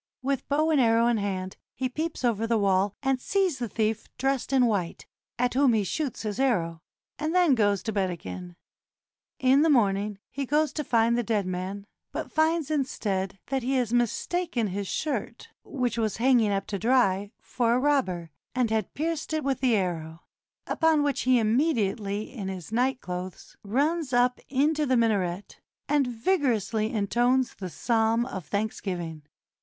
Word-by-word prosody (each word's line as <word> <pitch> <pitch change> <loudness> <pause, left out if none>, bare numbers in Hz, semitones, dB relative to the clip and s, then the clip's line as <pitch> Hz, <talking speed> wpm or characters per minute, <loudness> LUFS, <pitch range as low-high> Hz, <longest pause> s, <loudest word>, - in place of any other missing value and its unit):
With 275 0 -2
bow 305 +3 +2
and 295 -4 +4
arrow 230 -1 +4
in 240 -1 +2
hand, 190 -2 -3 0.2
he 260 - -1
peeps 305 +1 -3
over 225 -1 +1
the 230 0 +2
wall, 195 -1 +2
and 265 -2 +1
sees 375 -7 0
the 240 -3 -3
thief 220 +1 -1
dressed 270 0 -1
in 260 -2 +4
white, 200 -7 -1 0.3
at 245 0 +1
whom 265 -1 +4
he 215 -2 +2
shoots 280 - -3
his 210 0 -3
arrow, 170 -12 +1 0.4
and 315 +3 -1
then 355 -5 +5
goes 205 -5 +2
to 220 - -2
bed 195 -3 0
again. 90 - -7 0.8
In 265 +2 +4
the 320 - +4
morning 205 -6 +2
he 275 -1 -4
goes 300 +2 +1
to 300 - -2
find 235 -2 +2
the 240 - +1
dead 215 -4 0
man, 185 +2 -4 0.3
but - - -5
finds 315 -1 +1
instead 200 -10 -1
that 270 0 0
he 255 +3 -1
has 245 -3 0
mistaken 240 - 0
his 200 +1 -3
shirt, 305 +8 -3
which 250 -4 -2
was 220 -2 -1
hanging 240 -2 +4
up 195 0 -1
to 200 - -4
dry, 205 -4 +2
for 235 -1 0
a - - +2
robber, 215 - 0 0.2
and 245 -3 +1
had 220 -3 -1
pierced 315 0 -2
it 310 - -1
with 270 -1 0
the 255 -3 +3
arrow, 165 -4 -3 0.4
upon 320 -3 +2
which 285 -2 0
he 255 - +6
immediately 215 -4 0
in 205 -7 -5
his 190 -1 -6
night 255 +3 +1
clothes 180 0 -7
runs 285 +6 0
up 245 +1 +3
into 295 +3 +1
the 255 -1 +3
minaret, 200 -5 0 0.3
and 285 -2 +2
vigorously 230 - 0
intones 240 +4 +1
the 185 -2 -7
psalm 225 +5 +1
of 190 - -7
thanksgiving. 180 -6 -3
235 Hz, 170 wpm, -27 LUFS, 200-270 Hz, 0.8 s, he